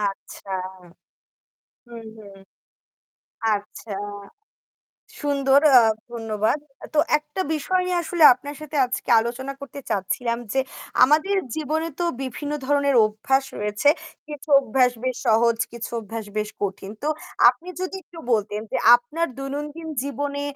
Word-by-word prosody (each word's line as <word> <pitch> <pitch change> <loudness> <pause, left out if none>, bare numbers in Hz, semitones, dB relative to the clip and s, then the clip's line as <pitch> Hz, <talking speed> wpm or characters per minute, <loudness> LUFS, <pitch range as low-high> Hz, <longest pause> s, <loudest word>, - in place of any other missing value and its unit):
আচ্ছা। 200 -1 -5 1.4
হুম, 235 -1 -10
হুম, 200 -2 -13 1.2
আচ্ছা, 205 +1 -6 1.3
সুন্দর 280 -1 +3
আ - - +11 0.3
ধন্যবাদ। 225 +2 -1 0.3
তো - - -1 0.2
একটা 300 +4 -5
বিষয় 365 +5 0
নিয়ে 360 - 0
আসলে 335 0 +1
আপনার 285 +4 -9
সাথে 305 0 -8
আজকে 250 +1 -5
আলোচনা 240 +4 -4
করতে 280 0 -8
চাচ্ছিলাম 235 +5 -1 0.2
যে 270 - +2 0.4
আমাদের 310 +9 +4 0.2
জীবনে 315 +1 -1
তো - - +1 0.2
বিভিন্ন 275 +3 -5
ধরনের 280 0 +2
অভ্যাস 220 +6 0
রয়েছে, 210 +5 -1 0.4
কিছু 295 0 -9
অভ্যাস 255 -1 +2
বেশ 255 -1 -1
সহজ, 230 +1 +4 0.2
কিছু 235 -1 -6
অভ্যাস 225 +1 -6
বেশ 210 0 -1
কঠিন। 195 0 -3
তো - - 0 0.4
আপনি 255 +8 -6
যদি 370 +1 -3
একটু 340 - -16
বলতেন 210 -1 0
যে - - 0 0.2
আপনার 295 +8 -2
দৈনন্দিন 295 +4 -5 0.2
জীবনে 285 0 -3
265 Hz, 125 wpm, -23 LUFS, 225-295 Hz, 1.4 s, আ